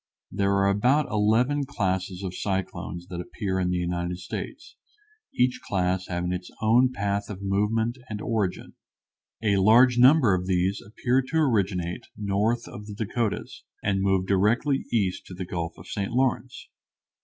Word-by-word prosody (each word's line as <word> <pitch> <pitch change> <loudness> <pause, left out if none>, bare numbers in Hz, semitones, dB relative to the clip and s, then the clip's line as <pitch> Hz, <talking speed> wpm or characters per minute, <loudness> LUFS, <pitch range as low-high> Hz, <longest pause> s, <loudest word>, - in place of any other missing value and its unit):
There 100 0 +1
are 100 0 +3
about 125 +9 +2
eleven 115 +7 +2
classes 95 -8 -2
of 95 -1 -4
cyclones 95 -2 -3
that 90 -1 -4
appear 95 0 -3
in 90 -1 0
the 90 - 0
United 90 0 -2
States, 90 0 -7 0.6
each 125 0 +1
class 90 -1 -1
having 90 0 -2
its 90 0 -5
own 120 +4 +4
path 100 -3 -2
of 100 -1 -7
movement 110 +5 0
and 105 -1 -4
origin. 105 -4 -2 0.7
A 100 -2 +3
large 120 +5 +5
number 130 -4 +6
of 90 0 -1
these 95 +1 +1
appear 125 +5 0
to 160 - -1
originate 100 - 0
north 105 +4 0
of 105 0 -9
the 105 - -7
Dakotas, 110 +1 -3 0.2
and 100 -1 +1
move 95 -1 +2
directly 110 +9 +2
east 100 -6 0
to 90 - -9
the 95 0 -5
Gulf 85 -1 -4
of 85 - -12
St. 100 0 -3
Lawrence. 125 0 -1
100 Hz, 155 wpm, -26 LUFS, 95-115 Hz, 0.7 s, number